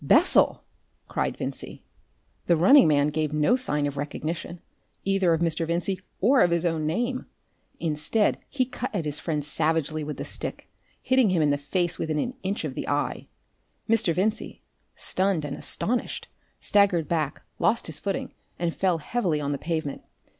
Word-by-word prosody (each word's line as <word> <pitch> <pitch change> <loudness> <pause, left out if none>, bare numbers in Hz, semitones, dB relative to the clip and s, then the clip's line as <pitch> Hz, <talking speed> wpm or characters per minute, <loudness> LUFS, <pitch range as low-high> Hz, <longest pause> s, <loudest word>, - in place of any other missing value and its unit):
"Bessel!" - - +4 0.4
cried - - -2
Vincey. - - -6 0.6
The 170 - +4
running 195 - +7
man 145 -1 +3
gave 155 0 -1
no 150 +10 +3
sign 150 - 0
of 145 0 -3
recognition 160 +4 -4 0.5
either 195 -3 +2
of 165 0 +1
Mr. 165 -1 0
Vincey 180 +3 -1 0.2
or 255 +7 +4
of - - +5
his 170 0 +1
own 160 -2 0
name. 240 +10 -1 0.5
Instead, 160 +7 +1
he 260 -2 +1
cut 255 0 -5
at 170 -5 -1
his 150 -1 -3
friend 150 -4 -2
savagely 155 0 0
with 150 0 -5
the - - -5
stick, - - -3 0.4
hitting 260 -4 +4
him 175 -4 +2
in 145 - +3
the - - +3
face 175 +5 -1
within 155 -1 -1
an 245 +11 -1
inch 195 +2 -2
of - - -4
the - - -5
eye. - - -1 0.6
Mr. 225 -5 +3
Vincey, 200 +6 -2 0.3
stunned 185 -5 +1
and 140 - -4
astonished, 245 +2 -2 0.3
staggered 195 -6 +3
back, 155 -3 -1 0.2
lost 230 - +2
his 155 -2 -4
footing, 195 -2 -3 0.2
and 170 -1 -1
fell 185 -3 +1
heavily 170 -1 -1
on 145 -1 -2
the 140 - -2
pavement. 160 -4 -3
170 Hz, 170 wpm, -26 LUFS, 150-195 Hz, 0.6 s, running